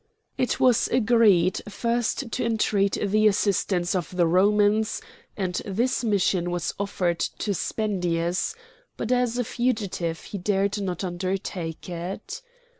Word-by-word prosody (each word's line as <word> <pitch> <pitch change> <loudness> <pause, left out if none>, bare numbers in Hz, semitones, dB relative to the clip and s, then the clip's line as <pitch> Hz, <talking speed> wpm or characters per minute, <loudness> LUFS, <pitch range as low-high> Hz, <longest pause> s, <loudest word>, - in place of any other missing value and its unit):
It 255 - 0
was 250 -2 +4
agreed 215 -6 +3
first 235 +3 -1
to - - -1
entreat 215 -3 +1
the 215 +1 +3
assistance 195 -3 +1
of 180 -1 -3
the 175 - +4
Romans, 205 +5 +3 0.4
and 185 -3 -2
this 235 +6 0
mission 190 -5 +1
was 175 -1 -2
offered 180 -4 -1
to 205 - -2
Spendius, 180 - -1 0.4
but 225 - -3
as 245 -1 +1
a 245 - +1
fugitive 205 -9 -2
he 200 - -7
dared 200 +2 0
not 185 -2 -3
undertake 180 -2 -4
it. 175 +2 -6
200 Hz, 125 wpm, -25 LUFS, 180-220 Hz, 0.4 s, was